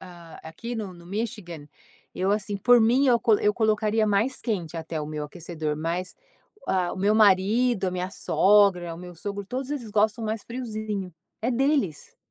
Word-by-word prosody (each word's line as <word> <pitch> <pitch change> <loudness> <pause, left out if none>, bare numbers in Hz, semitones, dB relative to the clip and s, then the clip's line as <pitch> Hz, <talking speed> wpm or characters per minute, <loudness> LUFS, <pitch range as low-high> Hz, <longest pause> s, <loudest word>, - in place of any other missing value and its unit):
ah, 170 -3 -12
aqui 230 +10 -7
no 205 -5 -5
no 170 -1 -15
Michigan, 190 -7 -5 0.5
eu 190 +2 0
assim, 205 -1 -1
por 245 +4 +5
mim, 250 +5 +4
eu 240 -2 +4
col 220 -3 +3
eu 210 0 +2
colocaria 215 -1 +1
mais 215 +6 +1
quente 180 -8 -3
até 160 -1 -4
o 150 - -4
meu 150 -1 -4
aquecedor. 160 -1 -5
Mas, 170 +4 -3 0.5
ah, 180 -2 0
o - - -7
meu 200 +3 +2
marido, 210 +2 +3
a - - 0
minha 180 +1 -3
sogra, 190 -6 +3
o - - -11
meu 180 0 -10
sogro, 200 +4 -5
todos 260 +5 -4
eles 245 -7 -4
gostam 215 +2 +1
mais 220 -1 -3
friozinho, 215 -6 -5 0.3
é 230 +4 0
deles. 260 - 0
205 Hz, 180 wpm, -25 LUFS, 175-225 Hz, 0.5 s, por